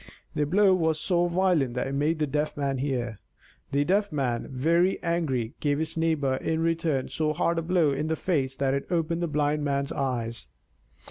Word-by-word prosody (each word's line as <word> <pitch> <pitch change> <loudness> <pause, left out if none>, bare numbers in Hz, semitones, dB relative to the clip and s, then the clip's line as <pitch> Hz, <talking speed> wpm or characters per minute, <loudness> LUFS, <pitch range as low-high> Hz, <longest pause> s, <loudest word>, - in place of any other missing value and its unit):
The 150 -1 0
blow 195 +4 +4
was 160 -3 +1
so 175 +1 +2
violent 175 -8 +1
that 125 - -1
it 135 - -4
made 150 +4 +1
the 155 - +1
Deaf 150 +2 -2
Man 140 -2 -1
hear! 125 -5 -2 0.5
The 140 +1 +2
Deaf 200 +3 +1
Man, 130 -5 -1
very 165 +8 +2
angry, 145 -9 -1
gave 145 -1 +1
his 160 +1 -2
neighbor 155 -5 +1
in 160 +3 -1
return 165 -5 0
so 155 -1 0
hard 170 +2 +1
a - - -1
blow 165 -3 +2
in 140 +3 -1
the 160 - 0
face 140 -7 -1
that 135 0 0
it 140 - -2
opened 170 -1 0
the 170 - 0
Blind 150 0 0
Man's 140 0 -1
eyes! 120 - -2
150 Hz, 195 wpm, -27 LUFS, 135-165 Hz, 0.5 s, blow